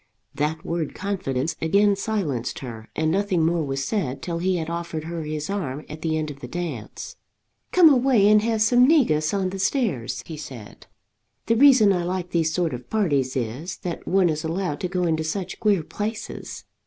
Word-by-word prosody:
That 155 +2 -2
word 165 -3 -3
confidence 165 -7 -2
again 200 +5 +3
silenced 195 - -2
her, 115 -4 -8
and 160 0 +1
nothing 190 -3 +1
more 165 0 +1
was 135 -1 -2
said 140 - -2
till 170 -1 -3
he 185 +2 +1
had 160 -2 -2
offered 170 -2 -4
her 165 +1 -4
his 150 -1 -4
arm 155 -8 -3
at 155 +1 -9
the 160 -1 0
end 155 -1 -2
of 140 - -11
the - - -7
dance. 160 -11 -6 0.5
"Come 360 -2 +7
away 255 -7 +5
and 210 0 +6
have 220 -1 +1
some 245 +3 +5
negus 155 - +3
on 190 -2 -1
the 195 - -5
stairs," 190 - -1
he 160 - -7
said. 130 -8 -10 0.6
"The 230 - +2
reason 250 -6 +6
I 180 -2 0
like 180 0 -3
these 165 -2 +1
sort 170 -3 0
of 125 0 -8
parties 145 -12 +1
is, 130 +9 -3
that 175 -2 -5
one 185 -1 +3
is 155 0 -2
allowed 165 -2 -2
to 180 - -2
go 180 0 -1
into 160 -2 +1
such 185 +3 -4
queer 200 -6 +2
places. 215 +7 -5
170 Hz, 190 wpm, -24 LUFS, 150-200 Hz, 0.6 s, Come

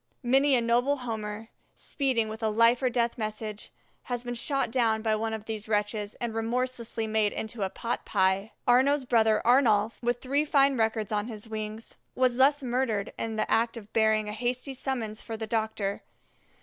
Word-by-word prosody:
Many 270 +3 +4
a 240 - +3
noble 245 +5 +2
Homer, 220 -3 -5 0.3
speeding 260 -6 -1
with 220 +1 -7
a 220 - +1
life 230 +3 +4
or 255 - +2
death 235 0 0
message, 215 -1 -5 0.3
has 245 -1 -3
been 245 0 -4
shot 260 0 0
down 225 -3 +1
by 220 -1 +2
one 220 +1 -2
of 220 -1 -5
these 220 -1 -5
wretches 210 0 -1
and 235 -2 -4
remorselessly 235 0 -2
made 215 -1 +1
into 220 0 -5
a 190 - 0
pot 235 +4 -4
pie. 195 +2 +1 0.2
Arnaux's 265 +3 +4
brother 220 -3 +3
Arnolf, 230 -4 +3
with 240 0 0
three 280 +4 +1
fine 280 -2 +3
records 220 -2 0
on 210 +1 -1
his 220 -2 -8
wings, 215 0 -6 0.2
was 255 -1 +2
thus 280 +2 +4
murdered 240 -5 -1
in 225 -1 -3
the 215 - -1
act 230 +1 +2
of 215 -2 -11
bearing 220 -1 +2
a 210 - -4
hasty 245 +4 -2
summons 245 -5 -3
for 225 -1 -6
the 220 - -4
doctor. 220 -2 -2
225 Hz, 185 wpm, -28 LUFS, 215-250 Hz, 0.3 s, Many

